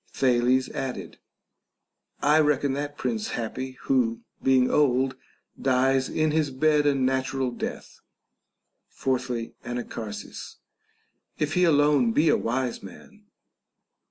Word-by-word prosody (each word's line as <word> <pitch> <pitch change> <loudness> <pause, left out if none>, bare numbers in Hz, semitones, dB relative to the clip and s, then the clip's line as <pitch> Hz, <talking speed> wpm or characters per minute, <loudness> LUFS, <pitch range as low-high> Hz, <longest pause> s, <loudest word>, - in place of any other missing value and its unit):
Thales 125 0 +2
added, 125 -10 -5 1.0
I 150 +2 +5
reckon 145 -2 +2
that 145 +1 -4
prince 225 -1 -2
happy, 130 +3 -4
who, 120 -4 +1 0.2
being 130 -1 +4
old, 130 -2 +2 0.5
dies 130 0 +2
in 155 -1 +1
his 155 -1 +1
bed 150 +2 +2
a 145 - +3
natural 130 0 0
death. 120 - -6 0.9
Fourthly, 125 -3 -2
Anacharsis, 115 -3 -6 0.8
If 150 0 -1
he 180 0 +3
alone 145 -6 +3
be 155 +5 +3
a - - +5
wise 125 +1 -2
man. 210 - -14
130 Hz, 110 wpm, -26 LUFS, 125-145 Hz, 1.0 s, I